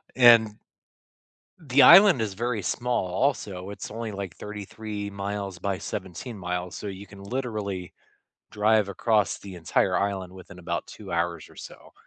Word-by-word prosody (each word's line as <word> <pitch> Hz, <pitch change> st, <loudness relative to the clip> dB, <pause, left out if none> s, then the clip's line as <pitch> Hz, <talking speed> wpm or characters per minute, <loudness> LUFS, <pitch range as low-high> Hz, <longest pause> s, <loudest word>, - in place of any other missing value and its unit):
And 115 Hz, -4 st, +6 dB, 1.0 s
the 140 Hz, -4 st, +3 dB
island 195 Hz, -, +9 dB
is 105 Hz, -3 st, -3 dB
very 115 Hz, 0 st, -2 dB
small, 120 Hz, +1 st, -1 dB
also. 95 Hz, -2 st, -1 dB
It's 100 Hz, -, -7 dB
only 115 Hz, 0 st, -5 dB
like 100 Hz, -4 st, -6 dB
33 105 Hz, 0 st, -6 dB
miles 100 Hz, -1 st, -4 dB
by 100 Hz, -1 st, -2 dB
17 100 Hz, +4 st, -6 dB
miles, 90 Hz, -1 st, -4 dB
so -, -, -7 dB
you 100 Hz, +1 st, -8 dB
can 100 Hz, 0 st, -13 dB
literally 105 Hz, -6 st, -4 dB, 0.6 s
drive 105 Hz, -1 st, +2 dB
across 105 Hz, +1 st, +1 dB
the 100 Hz, -2 st, -10 dB
entire 85 Hz, -2 st, +1 dB
island 95 Hz, -2 st, -2 dB
within 95 Hz, 0 st, -12 dB
about 85 Hz, 0 st, -3 dB
2 100 Hz, -3 st, -11 dB
hours 85 Hz, -2 st, -2 dB
or -, -, -18 dB
so. -, -, -12 dB
100 Hz, 150 wpm, -26 LUFS, 95-110 Hz, 1.0 s, island